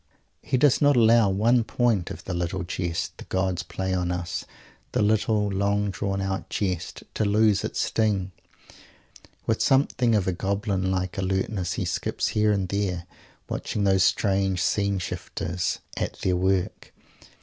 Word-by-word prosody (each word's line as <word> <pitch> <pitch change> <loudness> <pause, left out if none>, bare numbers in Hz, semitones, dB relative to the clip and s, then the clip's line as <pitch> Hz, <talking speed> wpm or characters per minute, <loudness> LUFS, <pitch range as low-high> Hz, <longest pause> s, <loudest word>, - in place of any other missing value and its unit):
He 130 - 0
does 140 0 +4
not 145 -1 +5
allow 115 -2 +5
one 115 +5 +3
point 110 -6 +1
of - - -8
the 90 - -4
little 90 +1 -2
jest 85 -1 -3
the - - -7
gods 95 -2 -1
play 95 +3 -3
on 90 -1 0
us 90 -1 -3 0.5
the - - +2
little 105 0 +2
long 100 +1 0
drawn 95 0 -2
out 95 0 -3
jest 95 -4 -3
to - - 0
lose 105 0 +3
its - - -3
sting. 100 -4 0 1.1
With - - 0
something 130 -3 +3
of 100 -3 +1
a - - +3
goblin 95 +1 -1
like 95 +1 -2
alertness 95 0 -1
he - - -2
skips - - -1
here 105 0 +2
and 100 -2 0
there, 95 -3 -1 0.4
watching 105 - -3
those 95 -1 +3
strange 95 -2 +2
scene 100 +3 +1
shifters 90 -1 -3 0.2
at - - -2
their 90 -1 +1
work. 95 0 -1
95 Hz, 155 wpm, -25 LUFS, 95-105 Hz, 1.1 s, not